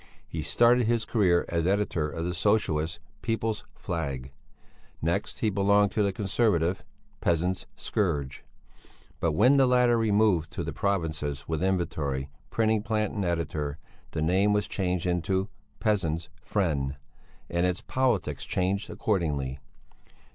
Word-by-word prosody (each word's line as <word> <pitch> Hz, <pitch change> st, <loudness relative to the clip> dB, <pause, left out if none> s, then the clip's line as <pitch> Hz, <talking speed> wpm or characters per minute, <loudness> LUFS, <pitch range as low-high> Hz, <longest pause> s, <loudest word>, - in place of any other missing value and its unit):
He 80 Hz, -, -4 dB
started 120 Hz, +7 st, +4 dB
his 115 Hz, -1 st, +1 dB
career 90 Hz, -7 st, +3 dB
as 85 Hz, 0 st, 0 dB
editor 95 Hz, -6 st, +1 dB
of 80 Hz, +2 st, -4 dB
the 90 Hz, -, -1 dB
Socialist 85 Hz, -4 st, +1 dB, 0.2 s
People's 115 Hz, -2 st, -1 dB
Flag. 70 Hz, -7 st, -4 dB, 0.7 s
Next 85 Hz, +6 st, -2 dB
he 110 Hz, -, +2 dB
belonged 100 Hz, +1 st, +3 dB
to 110 Hz, -, 0 dB
the 100 Hz, -1 st, +2 dB
Conservative 95 Hz, -3 st, +1 dB, 0.4 s
Peasants' 90 Hz, +2 st, 0 dB
Scourge, 75 Hz, -9 st, -2 dB, 0.8 s
but 85 Hz, -2 st, +1 dB
when 130 Hz, -, +5 dB
the 135 Hz, -1 st, +5 dB
latter 125 Hz, -2 st, +4 dB
removed 105 Hz, -7 st, +3 dB
to -, -, -3 dB
the -, -, -4 dB
provinces 80 Hz, -7 st, -2 dB
with 80 Hz, 0 st, -2 dB
inventory, 80 Hz, -7 st, -1 dB, 0.2 s
printing 110 Hz, -1 st, +2 dB
plant 110 Hz, -1 st, -1 dB
and 100 Hz, -, -2 dB
editor, 80 Hz, -4 st, -2 dB, 0.3 s
the 75 Hz, -, -2 dB
name 95 Hz, +5 st, +3 dB
was 105 Hz, 0 st, +1 dB
changed 90 Hz, -2 st, -1 dB
into 90 Hz, +2 st, 0 dB, 0.3 s
Peasants' 85 Hz, -7 st, 0 dB
Friend, 75 Hz, -11 st, 0 dB, 0.5 s
and 85 Hz, +1 st, 0 dB
its 90 Hz, 0 st, -1 dB
politics 110 Hz, -, 0 dB
changed 95 Hz, +3 st, -1 dB
accordingly. 75 Hz, -10 st, -1 dB
90 Hz, 135 wpm, -28 LUFS, 80-105 Hz, 0.8 s, when